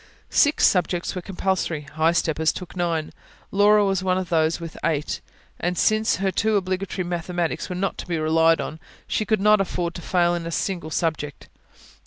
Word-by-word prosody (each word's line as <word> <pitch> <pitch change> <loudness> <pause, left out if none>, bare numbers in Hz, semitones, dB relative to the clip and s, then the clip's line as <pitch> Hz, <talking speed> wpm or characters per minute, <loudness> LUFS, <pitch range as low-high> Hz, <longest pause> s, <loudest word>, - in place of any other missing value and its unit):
Six 290 0 +4
subjects 180 -1 +1
were 180 - -4
compulsory; 185 -4 -1
high 155 +3 0
steppers 160 -1 +1
took 180 - -9
nine. 170 -3 -1 0.4
Laura 205 +1 +5
was 195 -2 +1
one 185 -1 +1
of 185 -2 -3
those 160 0 +2
with 165 -1 -7
eight, 150 -2 -1 0.4
and 175 +1 -1
since 215 0 +3
her 190 0 0
two 220 +4 +1
obligatory 185 -1 -1
mathematics 175 -1 -2
were 180 - -3
not 195 +2 -2
to - - -6
be 170 -2 -1
relied 160 +1 +3
on, 155 - -5 0.3
she 215 - -1
could 220 -2 +1
not 210 0 +5
afford 175 -2 -2
to 175 - -8
fail 175 0 +2
in 170 -1 -3
a - - -4
single 175 -2 -2
subject. 155 -3 -3
175 Hz, 185 wpm, -23 LUFS, 165-190 Hz, 0.4 s, Laura